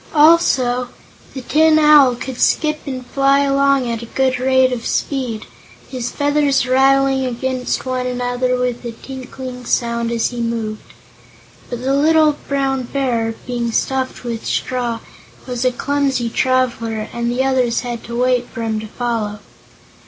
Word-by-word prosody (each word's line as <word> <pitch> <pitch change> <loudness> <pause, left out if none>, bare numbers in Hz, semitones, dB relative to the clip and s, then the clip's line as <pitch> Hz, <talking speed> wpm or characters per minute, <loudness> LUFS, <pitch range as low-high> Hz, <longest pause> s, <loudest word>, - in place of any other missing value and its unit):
Also 265 -6 +4 0.5
the 265 - -4
Tin 315 +4 +4
Owl 300 -5 +6
could 250 +1 -6
skip 305 -1 +2
and 255 -2 -5
fly 275 +2 +2
along 275 -2 +2
at 230 -1 -3
a 235 - -8
good 260 +1 0
rate 260 0 +3
of 235 -2 -4
speed, 250 -6 -2 0.4
his 250 -2 -4
feathers 285 -2 +1
rattling 270 +1 +3
against 255 +1 -2
one 255 -1 -2
another 250 0 -1
with 250 -1 -2
a 235 -1 -5
tinkling 255 0 -8
sound 235 -1 -1
as 230 0 0
he 240 -1 -4
moved. 230 -2 -4 0.8
But 245 -1 -5
the 270 +1 +1
little 305 +1 +4
Brown 270 -2 0
Bear, 235 -5 -1
being 240 -1 -2
stuffed 260 +3 -1
with 230 -2 -4
straw, 240 -3 -2 0.4
was 250 -1 -3
a 255 - +3
clumsy 270 -2 -1
traveler 235 -4 0
and 235 0 -2
the 250 +2 0
others 255 -4 +1
had 240 -2 -5
to 235 0 -4
wait 250 -1 +1
for 230 - -6
him 220 -1 -1
to 215 - -7
follow. 225 -2 -3
255 Hz, 150 wpm, -18 LUFS, 235-270 Hz, 0.8 s, Owl